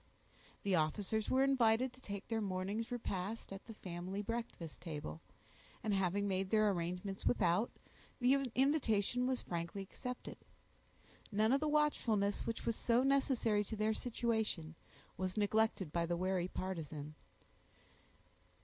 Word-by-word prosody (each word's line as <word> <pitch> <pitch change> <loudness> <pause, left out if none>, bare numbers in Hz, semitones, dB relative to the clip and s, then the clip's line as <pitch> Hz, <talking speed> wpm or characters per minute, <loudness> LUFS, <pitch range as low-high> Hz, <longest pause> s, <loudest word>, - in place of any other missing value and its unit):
The 200 - +1
officers 195 +7 +1
were 260 +1 +4
invited 250 -2 +3
to 260 - -18
take 200 -3 -6
their 225 -1 0
morning's 200 +4 -2
repast 210 -3 -3
at 195 - -9
the 225 - -9
family 185 +2 -4
breakfast 230 -7 -5
table, 150 - -5 0.6
and 215 -1 +1
having 195 +1 +1
made 190 -1 0
their 215 -1 +4
arrangements 180 +2 -3
without, 190 0 +3 0.5
the 250 +1 +5 0.2
invitation 250 -4 +2
was 260 -1 0
frankly 170 +3 -3
accepted. 250 +5 -6 0.9
None 215 +2 +3
of 275 - +4
the 305 - 0
watchfulness, 230 -9 +2
which 230 - -3
was 230 - +1
so 235 +2 +3
necessary 265 -6 +3
to 220 - -5
their 215 +1 +2
situation, 220 -9 -1 0.4
was 185 +3 -2
neglected 210 -5 +2
by 170 -1 +1
the 175 0 0
wary 185 0 +1
partisan. 155 -6 -4
205 Hz, 135 wpm, -37 LUFS, 185-230 Hz, 0.9 s, the